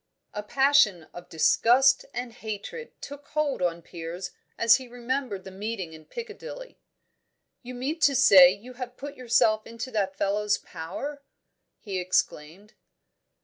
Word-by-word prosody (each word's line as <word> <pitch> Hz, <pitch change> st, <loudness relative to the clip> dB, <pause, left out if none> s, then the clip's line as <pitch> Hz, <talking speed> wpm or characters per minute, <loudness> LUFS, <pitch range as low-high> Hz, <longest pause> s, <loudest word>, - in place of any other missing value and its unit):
A 210 Hz, -, -3 dB
passion 265 Hz, -, +3 dB
of 175 Hz, 0 st, -11 dB
disgust 245 Hz, -, +4 dB
and 245 Hz, -1 st, -5 dB
hatred 220 Hz, -, -7 dB
took 285 Hz, 0 st, -9 dB
hold 300 Hz, -7 st, -1 dB
on 170 Hz, -1 st, -1 dB
Piers 175 Hz, +2 st, -7 dB, 0.3 s
as 230 Hz, -1 st, +6 dB
he 260 Hz, -1 st, -10 dB
remembered 245 Hz, -4 st, -3 dB
the 190 Hz, -, -10 dB
meeting 195 Hz, -3 st, -5 dB
in 155 Hz, -1 st, -13 dB
Piccadilly. 480 Hz, -, -9 dB, 0.8 s
"You 250 Hz, 0 st, -9 dB
mean 280 Hz, +7 st, -3 dB
to 285 Hz, -2 st, +4 dB
say 195 Hz, -9 st, +8 dB
you 215 Hz, +6 st, -9 dB
have 250 Hz, 0 st, -8 dB
put 285 Hz, 0 st, -7 dB
yourself 225 Hz, -3 st, +2 dB
into 230 Hz, +3 st, -7 dB
that 195 Hz, -4 st, -1 dB
fellow's 205 Hz, +1 st, +1 dB
power?" 275 Hz, -, -7 dB, 0.6 s
he 195 Hz, -3 st, -4 dB
exclaimed. 180 Hz, +1 st, -2 dB
230 Hz, 140 wpm, -26 LUFS, 190-270 Hz, 0.8 s, say